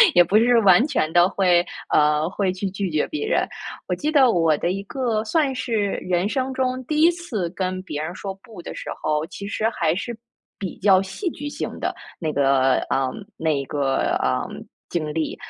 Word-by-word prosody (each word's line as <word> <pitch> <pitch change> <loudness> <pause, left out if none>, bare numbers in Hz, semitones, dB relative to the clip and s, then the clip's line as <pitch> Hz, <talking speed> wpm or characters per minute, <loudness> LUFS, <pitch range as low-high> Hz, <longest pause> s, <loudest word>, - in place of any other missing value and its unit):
也 175 - +8
不 200 +5 +3
是 235 +1 +5
完 200 +5 +6
全 160 - 0
地 175 +1 +5
会， 180 -3 +3 0.2
呃， 150 +2 +3
会 190 -1 -1
去 190 +1 -3
拒 190 -1 -3
绝 155 -1 +1
别 310 +8 -3
人。 480 - +1 0.4
我 - - 0
记 305 +1 -2
得 270 -5 +5
我 165 -4 +3
的 170 - -1
一 195 +1 -3
个 225 -1 -1
算 280 +2 +1
是 245 -2 -3 0.2
人 180 +2 0
生 265 0 -1
中 255 0 -1
第 305 +2 0
1 335 - +7
次 250 - -4
跟 185 0 -3
别 150 -6 -5
人 170 +3 -4
说 195 -1 -5
不 200 -2 -13
的 - - -8
时 - - -7
候， 150 0 0
其 200 +4 -8
实 220 +1 0
还 165 -7 0
是 235 +4 -4 0.4
比 190 -4 -5
较 190 -1 +5
戏 195 - -5
剧 290 0 -6
性 - - -5
的， - - -2 0.2
那 160 -3 -1
个 135 -2 +3 0.2
嗯， 135 -1 +1 0.2
那 150 -4 0
个， 135 -2 0
嗯， 65 0 -2 0.3
经 155 -3 -2
历。 160 0 -2
190 Hz, 210 characters per minute, -23 LUFS, 160-240 Hz, 0.4 s, 也